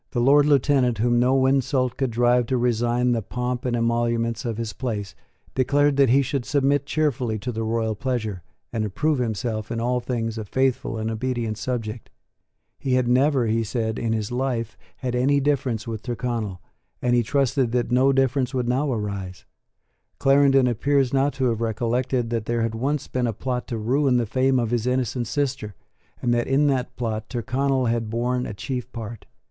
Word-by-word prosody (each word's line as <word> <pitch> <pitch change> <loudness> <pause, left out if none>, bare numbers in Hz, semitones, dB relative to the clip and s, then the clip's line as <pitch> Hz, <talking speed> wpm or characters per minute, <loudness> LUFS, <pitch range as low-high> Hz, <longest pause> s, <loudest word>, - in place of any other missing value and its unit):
The 120 - 0
Lord 140 +4 +5
Lieutenant, 135 -4 +3
whom 120 +2 +2
no 130 +2 +3
insult 130 -1 +1
could 135 -2 -1
drive 120 +1 +2
to 130 - +1
resign 120 +1 +1
the 115 -2 +1
pomp 125 +3 -3
and 125 -1 0
emoluments 115 0 0
of 115 -2 -2
his 115 -2 -4
place, 105 -7 -4 0.4
declared 145 +2 +2
that 140 -3 +5
he 135 +3 +5
should 135 0 -2
submit 140 0 +1
cheerfully 135 -8 0
to 125 +4 -4
the 115 -1 -4
royal 110 0 0
pleasure, 110 -4 -3 0.3
and 110 -2 -1
approve 140 +8 0
himself 110 -1 -2
in 115 - -2
all 125 +2 0
things 115 -2 -3
a 110 - -5
faithful 130 0 0
and 110 +1 -2
obedient 115 -2 -2
subject. 115 -2 -4 0.7
He 130 -2 0
had 130 -1 +2
never, 130 +1 +3
he 115 +1 +1
said, 110 0 -2
in 115 - -1
his 110 -1 -2
life, 120 -3 -2 0.2
had 125 -1 -3
any 135 +3 +3
difference 135 -6 0
with 110 -2 -5
Tyrconnel, 115 -5 -3 0.4
and 125 -1 +1
he 120 - +4
trusted 135 0 +1
that 120 -1 0
no 130 +2 +4
difference 135 0 +1
would 125 -2 0
now 135 +4 +1
arise. 100 -5 -4 0.7
Clarendon 135 -1 +4
appears 135 +2 +1
not 135 +1 +3
to 130 - -1
have 115 -1 -2
recollected 120 +2 -1
that 115 -2 -1
there 120 -1 0
had 115 -1 -1
once 135 +5 -1
been 125 -1 -1
a 115 - -1
plot 125 +3 -3
to 115 - -3
ruin 130 +4 +2
the 120 - +1
fame 130 +4 +2
of 120 -2 0
his 120 0 0
innocent 125 -1 0
sister, 135 -8 -2 0.5
and 120 -1 +2
that 120 0 0
in 135 +2 +3
that 135 -3 0
plot 110 -3 -3
Tyrconnel 130 +2 0
had 115 -1 0
borne 125 +2 -1
a 105 - -6
chief 125 +3 -5
part. 115 -1 -8
125 Hz, 185 wpm, -24 LUFS, 115-130 Hz, 0.7 s, Lord